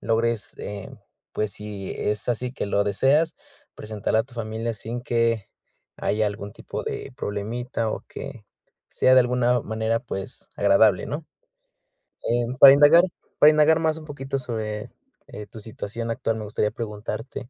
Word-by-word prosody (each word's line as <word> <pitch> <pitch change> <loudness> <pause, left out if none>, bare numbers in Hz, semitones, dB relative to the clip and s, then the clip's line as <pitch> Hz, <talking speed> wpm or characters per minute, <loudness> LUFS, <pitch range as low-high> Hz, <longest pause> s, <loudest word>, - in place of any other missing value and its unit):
logres, 115 0 0
eh, 100 -1 -6 0.4
pues, 105 -2 -2
si 105 -2 -6
es 105 +3 -1
así 125 +1 -1
que - - -3
lo 100 0 +1
deseas, 140 +11 +2 0.4
presentar 105 -1 -2
a 110 - +4
tu 125 - -19
familia 115 0 -3
sin 115 +3 -5
que 115 -4 0 0.5
haya 105 +1 0
algún 100 0 -5
tipo - - -6
de 135 - -5
problemita, 110 +2 -3
o - - -4
que 110 - -8 0.4
sea 130 - +3
de 130 - +8
alguna 125 0 +2
manera, 110 +1 -1
pues, 95 -6 -6
agradable, 100 -1 +4
¿no? 155 +2 -5 1.0
Eh 120 0 +2
para 135 -1 +11
indagar, 145 +4 +7 0.4
para 150 - +9
indagar 155 +1 +4
más 160 -1 +1
un 155 - -11
poquito 135 -2 -4
sobre, 110 -4 -4 0.4
eh, 105 - -8
tu 110 - -11
situación 110 +1 -6
actual, 115 0 -1
me 110 - -5
gustaría 105 0 -1
preguntarte, 115 +3 -6
115 Hz, 155 wpm, -24 LUFS, 105-125 Hz, 1.0 s, para